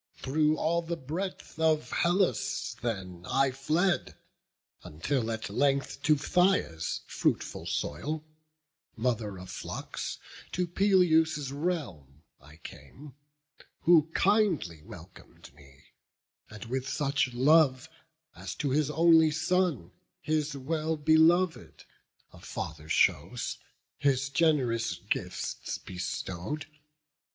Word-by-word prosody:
Through 155 +3 +1
all 170 +2 +1
the 170 0 -4
breadth 165 +4 -6
of 160 -1 +2
Hellas 175 - 0
then 95 -7 -4
I 135 0 +2
fled, 155 +8 0 0.7
Until 115 - -2
at 110 -1 -3
length 140 0 0
to 155 0 +4
Phthia's 150 - +1
fruitful - - -1
soil, 150 - -3 0.7
Mother 110 -4 -1
of 90 0 -9
flocks, - - -5 0.4
to 180 - 0
Peleus' 165 -6 +3
realm 120 - -4 0.2
I 70 +3 -16
came, 80 - -12 0.7
Who 160 -2 +5
kindly 190 - +2
welcom'd - - -14
me, 70 -1 -19 0.7
and 110 -1 -9
with 130 +3 -3
such 140 -3 0
love 140 +1 +4 0.5
As - - -7
to 140 -3 -2
his 150 +1 +1
only 160 0 +5
son, 160 - 0 0.3
his 150 -2 -1
well 155 +3 -2
belov'd, 160 +3 +3 0.5
A - - -14
father 80 -1 -7
shows, - - +1 0.4
his 135 -1 +1
gen'rous 135 -7 +1
gifts - - -4
bestow'd. 95 - -5
145 Hz, 105 wpm, -29 LUFS, 115-160 Hz, 0.7 s, Who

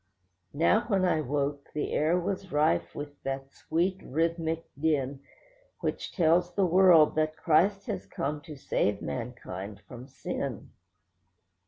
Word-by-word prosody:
Now 170 +9 +3
when 195 -5 +2
I 165 -3 +2
woke, 140 0 -2
the 150 - -2
air 165 +4 +2
was 185 +1 -3
rife 85 - +1
with 145 0 -7
that 135 0 -4
sweet, 185 +6 -1
rhythmic 165 +2 -1
din 140 -2 0 0.6
Which - - -3
tells 175 0 +2
the 195 - +3
world 175 -3 +6
that 155 0 +1
Christ 195 +5 +3
has - - -4
come 145 +1 -3
to 150 +1 -10
save 105 -6 -1
mankind 105 -5 -6
from 125 +1 -10
sin. 135 - -5
155 Hz, 135 wpm, -29 LUFS, 135-175 Hz, 0.6 s, world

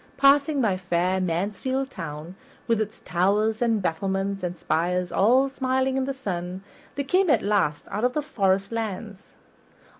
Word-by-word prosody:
Passing 280 +1 +4
by 200 -6 +1
fair 185 +1 0
Mansfield 210 +10 -1
Town, 160 -2 -7 0.3
with 230 -2 +1
its 215 0 -5
towers 205 +5 +1
and 225 -4 +1
battlements 195 +3 -1
and 180 0 -4
spires 180 +3 0
all 250 +7 +4
smiling 265 -1 0
in 265 -1 0
the 275 - -2
sun, 185 -6 -4 0.3
they 280 - -1
came 365 +6 +2
at - - +3
last 195 -7 +1
out 210 - -2
of 250 0 +2
the 300 - -1
forest 195 -6 0
lands. 215 -2 -5
205 Hz, 155 wpm, -25 LUFS, 185-260 Hz, 0.3 s, Passing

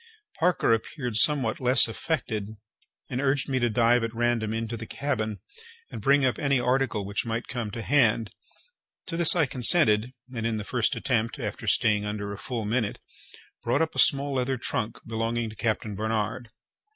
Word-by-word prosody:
Parker 175 -8 +2
appeared 120 +1 -4
somewhat 130 -5 +4
less 125 -1 +7
affected, 110 -5 -4 0.5
and 125 +1 -2
urged 140 -1 0
me 130 -1 -1
to 120 -1 +1
dive 120 +2 +2
at 115 0 -4
random 120 -2 0
into 115 +1 -3
the 115 -1 -8
cabin, 110 -7 -3 0.5
and - - -7
bring 140 0 +3
up 125 -4 0
any 140 -2 +1
article 125 -4 0
which 100 +1 -2
might 115 +1 -4
come 120 -6 -4
to 115 +2 -7
hand. 115 -6 +2 0.7
To 165 - -5
this 170 0 +7
I 165 -4 +3
consented, 125 -3 +3 0.2
and, 115 - -4
in 115 -1 -1
the 105 - -4
first 120 +1 -1
attempt, 115 -3 -1
after - - -6
staying 105 -1 +2
under 105 -1 -4
a 100 - -9
full 115 -4 -5
minute, 110 0 -2 0.6
brought 130 +7 +1
up 160 - -4
a - - -3
small 140 0 +3
leather 130 0 -1
trunk 110 -1 -3
belonging 115 0 -3
to - - -13
Captain 110 -1 -2
Barnard. 110 +2 -3
115 Hz, 175 wpm, -26 LUFS, 110-130 Hz, 0.7 s, less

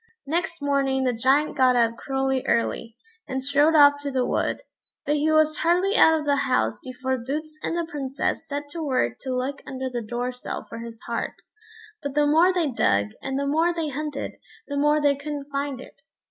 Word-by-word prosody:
Next 330 +1 -2
morning 275 -2 +1
the 250 -1 +1
Giant 265 +6 +2
got 255 -2 +4
up 230 -1 +3
cruelly 265 0 -1
early, 230 0 0 0.3
and 265 0 -3
strode 290 +3 +3
off 285 -1 +6
to 285 - -3
the 260 -2 0
wood; - - -1 0.4
but 295 +1 +1
he 305 +2 +2
was 310 -1 +3
hardly 360 +5 +2
out 320 -7 +6
of 300 - -6
the 285 -1 +2
house 115 - +1
before 260 0 -3
Boots 305 +6 -5
and 335 - -2
the 340 - -1
Princess 275 -4 -3
set 285 0 -3
to 335 - -5
work 255 - 0
to 260 -1 -3
look 265 +2 -3
under 260 0 -4
the 240 -1 -3
door 240 +3 -3
sill 250 - -6
for 230 - -8
his 230 -1 -8
heart; 235 -1 -3 0.7
but 285 -2 -5
the 295 0 +4
more 325 +5 +5
they 340 -6 0
dug, 100 - +1
and 270 0 -3
the 280 - -1
more 325 +5 +2
they 325 -3 -2
hunted, 290 0 -4 0.3
the 285 - -4
more 295 +1 +3
they 285 -1 +3
couldn't 285 0 -6
find 280 -2 -2
it. 195 - -13
280 Hz, 200 wpm, -24 LUFS, 255-300 Hz, 0.7 s, off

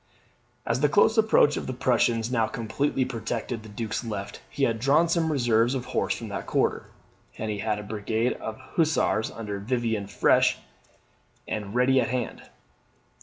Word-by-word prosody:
As 115 +2 0
the 150 +1 +3
close 205 +7 +4
approach 215 -10 +4
of - - -4
the 130 - -3
Prussians 120 -2 +1
now 115 -3 +2
completely 125 +5 -1
protected 115 -1 -4
the 110 - -12
Duke's 105 +1 -4
left, 105 -4 -6
he 140 - -3
had 115 -4 +1
drawn 145 +7 +4
some 165 -1 +1
reserves 120 -2 +2
of 125 -2 -3
horse - - -1
from - - -7
that - - -5
quarter, - - 0 0.5
and 110 0 -3
he 105 - -4
had 105 0 -1
a 105 - -6
brigade 110 +3 -1
of 110 0 -6
Hussars 130 -5 0
under 105 -3 -5
Vivian 110 -2 -1
fresh - - +3 0.9
and 105 0 -4
ready 130 +1 +4
at 115 - 0
hand. 125 -1 -3
115 Hz, 170 wpm, -26 LUFS, 110-130 Hz, 0.9 s, close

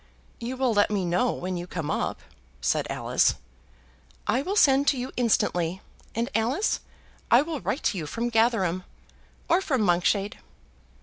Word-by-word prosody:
"You 250 +3 -4
will 255 -3 +2
let 205 -1 +3
me 200 -3 0
know 180 +8 +2
when 185 0 -4
you 175 +1 -6
come 165 -4 -3
up," - - -2 0.4
said 65 - 0
Alice. - - +2 0.9
"I 250 +5 +1
will 380 +8 -2
send 280 -7 +5
to 275 - +3
you 250 +1 -4
instantly; 185 -7 +1 0.4
and, 230 +1 0
Alice, 245 - +1 0.5
I 240 +4 +6
will 310 -2 -4
write 280 - -2
to 205 -2 0
you 155 - -5
from 235 +8 -2
Gatherum, 220 -6 +2 0.6
or 345 +3 +3
from 270 -10 0
Monkshade." 195 +4 +1
225 Hz, 160 wpm, -26 LUFS, 185-260 Hz, 0.9 s, I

